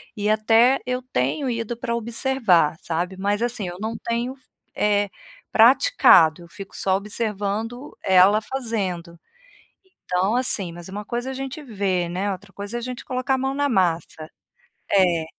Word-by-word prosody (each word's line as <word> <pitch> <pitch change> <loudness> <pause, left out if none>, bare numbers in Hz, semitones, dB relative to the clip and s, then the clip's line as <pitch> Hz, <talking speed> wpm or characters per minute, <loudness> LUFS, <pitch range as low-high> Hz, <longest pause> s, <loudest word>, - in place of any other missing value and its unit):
e 210 0 -1
até 225 +4 +4
eu 250 0 -2
tenho 255 - -1
ido 230 0 -3
pra 235 -1 -2
observar, 230 - +1
sabe. 175 +3 -3
Mas 205 +3 -1
assim 235 -5 -1
eu 175 - -7
não 220 +2 -3
tenho 235 +3 -3
f 260 - -27 0.3
eh, 205 -1 +1 0.4
praticado, 220 - +5
eu - - -14
fico 195 0 -11
só 190 -1 +1
observando 215 +4 -4
ela 190 +3 +5
fazendo. 195 -10 -4 0.9
Então 185 +4 +1
assim, 200 -8 +1
mas 175 +1 -10
uma 205 +2 -6
coisa 240 +4 -4
é - - -4
a - - -7
gente 270 +3 -6
ver, 195 -8 -1
né, 195 +3 -2
outra 195 +1 -10
coisa 205 +4 -6
é - - -5
a - - -10
gente 250 +2 -6
colocar 255 +1 -1
a - - 0
mão 265 +1 -1
na 285 0 0
massa. 170 - -1 0.6
É. 175 -5 +3
210 Hz, 170 wpm, -23 LUFS, 185-245 Hz, 0.9 s, praticado